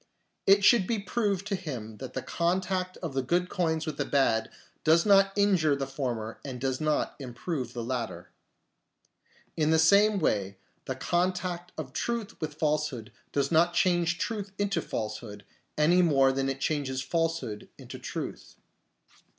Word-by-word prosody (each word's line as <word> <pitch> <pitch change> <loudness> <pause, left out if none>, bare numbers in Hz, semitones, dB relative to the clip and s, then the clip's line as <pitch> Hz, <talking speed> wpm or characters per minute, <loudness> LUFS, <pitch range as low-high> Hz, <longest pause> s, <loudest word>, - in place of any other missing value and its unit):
It 200 +1 +6
should 215 -6 +6
be 230 - 0
proved 200 -1 -1
to 205 -1 -1
him 125 - -6
that 130 +2 -8
the - - -4
contact 185 +1 -1
of 160 -5 -3
the 135 - +1
good 175 +7 0
coins 160 -3 0
with 155 -3 -4
the - - 0
bad 130 -6 +2 0.3
does 165 +2 +4
not 195 -1 +5
injure 185 -8 +3
the 140 0 -2
former 125 -5 -4
and 130 -3 -6
does 130 +1 -2
not 155 -1 0
improve 130 +1 -4
the 120 - -4
latter. 120 -1 -4 1.2
In 155 -1 +1
the 160 - +4
same 200 +6 +5
way 100 - 0 0.3
the 130 - -3
contact 180 +3 -1
of 140 -5 -6
truth 235 -3 -3
with 150 -2 -4
falsehood 150 -7 -1 0.2
does 140 -1 0
not 170 +2 +4
change 175 -1 +2
truth 205 -1 -3
into 205 -1 0
falsehood, 105 -2 -5 0.3
any 170 +4 +5
more 135 -6 +4
than 135 0 -1
it 135 0 -3
changes 135 -3 -1
falsehood 165 -11 -2
into - - -9
truth. - - -6
155 Hz, 160 wpm, -28 LUFS, 130-185 Hz, 1.2 s, It